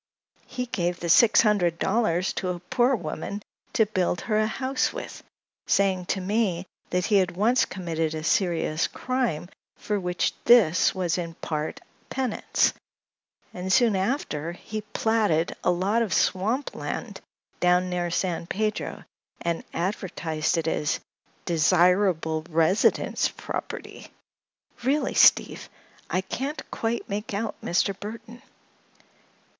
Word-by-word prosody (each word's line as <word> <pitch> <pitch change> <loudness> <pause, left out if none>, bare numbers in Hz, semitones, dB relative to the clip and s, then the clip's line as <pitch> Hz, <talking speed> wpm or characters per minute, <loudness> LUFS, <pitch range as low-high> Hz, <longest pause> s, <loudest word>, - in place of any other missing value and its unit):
He 250 -1 -4
gave 175 -7 -2
the 170 - -4
six 225 +6 +7
hundred 190 -6 +2
dollars 190 -4 +1
to 185 - -3
a 180 -1 -3
poor 250 +7 +2
woman 200 +2 -5 0.3
to 220 - +4
build 185 -4 -1
her 215 -2 0
a 215 - +2
house 260 +4 -1
with, - - -7 0.5
saying 190 -2 +2
to - - 0
me 190 -2 0 0.2
that 180 0 0
he 210 - +3
had 185 -2 +1
once 235 +6 +3
committed 165 -4 -3
a 155 - -5
serious 165 -2 +1
crime 250 -11 -2 0.3
for 210 -1 -2
which 180 -1 -1
this 195 -9 +5
was 180 -2 0
in 165 -1 -5
part 155 -2 -4 0.3
penance, 260 -4 +1 0.8
and 180 +1 -4
soon 230 -1 +4
after 185 - -1
he 215 +4 -6
platted 210 -6 +1
a - - +2
lot 190 +6 +1
of 215 -6 0
swamp 225 +9 +1
land - - -5 0.4
down 180 +1 +3
near 175 -1 -1
San 170 -1 -1
Pedro 215 +3 -2 0.4
and 170 -1 -2
advertised 170 -3 -2
it 165 -1 -1
as 150 -2 0 0.5
'desirable 170 -1 +3
residence 165 +4 +2
property.' - - -7 0.7
Really, 275 +5 +1
Steve, - - +4 0.4
I 185 - +1
can't 275 +10 -4
quite 230 +1 -2
make 205 +1 -4
out 215 +1 -2
Mr. 190 +3 +1
Burthon." 230 +3 -8
185 Hz, 130 wpm, -26 LUFS, 170-220 Hz, 0.8 s, six